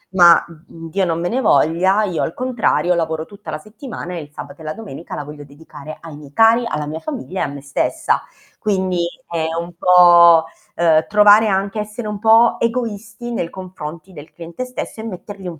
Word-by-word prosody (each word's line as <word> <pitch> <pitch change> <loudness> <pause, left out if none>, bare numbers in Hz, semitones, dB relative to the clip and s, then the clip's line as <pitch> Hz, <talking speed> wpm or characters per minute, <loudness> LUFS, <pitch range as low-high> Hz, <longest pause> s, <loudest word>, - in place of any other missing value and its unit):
ma, 175 -2 +7 0.2
mhmm, 165 0 -10
Dio 190 +3 0
non 165 -1 -1
me 175 +1 -2
ne 255 - -1
voglia, 190 +2 +3
io 180 -5 -2
al - - -3
contrario 235 -9 0
lavoro 160 -1 -2
tutta 195 -4 -10
la 155 - -3
settimana, 215 - -8
e 170 - -5
il 145 0 -13
sabato 180 +2 -10
e - - -10
la 155 0 -4
domenica 175 -7 -9
la - - -5
voglio 145 0 -10
dedicare 150 +1 -12
ai 160 -3 -10
miei 145 -2 -14
cari, 225 +4 +4
alla 150 -6 -3
mia 155 +2 -5
famiglia 245 - -5
e - - +2
a - - -1
me 140 0 -8
stessa. 140 0 -1 0.4
Quindi 185 -4 0 0.2
è 165 -2 -2
un 170 +1 -7
po', 175 -2 +7 0.3
uhm, 160 -2 +3
trovare 210 +1 +6
anche 195 +1 -1
essere 210 +2 -5
un 210 -1 -5
po' 225 +2 +5
egoisti 230 -1 -3
nei 170 -7 -2
confronti 180 -1 -9
del 150 -2 -12
cliente 170 +8 -7
stesso 250 -3 -7
e - - -8
mettergli 200 -2 -8
un 165 -3 -7
180 Hz, 200 wpm, -19 LUFS, 160-210 Hz, 0.4 s, ma